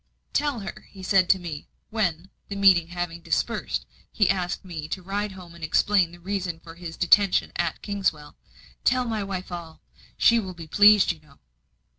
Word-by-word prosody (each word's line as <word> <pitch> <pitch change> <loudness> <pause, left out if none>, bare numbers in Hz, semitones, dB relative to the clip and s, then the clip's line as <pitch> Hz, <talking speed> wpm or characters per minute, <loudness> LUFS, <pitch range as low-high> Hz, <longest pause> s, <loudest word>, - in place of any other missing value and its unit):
"Tell 290 -6 0
her," 195 - -8
he 190 -1 -12
said 185 -1 +3
to 190 - +6
me, 165 -5 -7 0.2
when, 185 -5 -1 0.2
the 200 - -4
meeting 190 -4 +5
having 175 -1 -4
dispersed, - - -1 0.3
he 205 -3 +3
asked 180 -1 -3
me 160 -4 -6
to 185 +3 -5
ride 200 +2 -3
home 180 -3 -12
and 170 -1 -13
explain 180 +2 +3
the 175 - -13
reason 180 -2 -3
of 165 0 -11
his 170 -2 -8
detention 195 +2 +4
at 170 -2 -2
Kingswell 185 -8 -2 0.5
"Tell 255 0 +2
my 220 -3 -2
wife 190 -2 -5
all. 170 -2 -7 0.4
She 235 0 +5
will 190 -4 -6
be 165 -1 -9
pleased, 205 +5 +6
you 165 - -9
know." 150 -2 -22
180 Hz, 180 wpm, -25 LUFS, 170-200 Hz, 0.5 s, to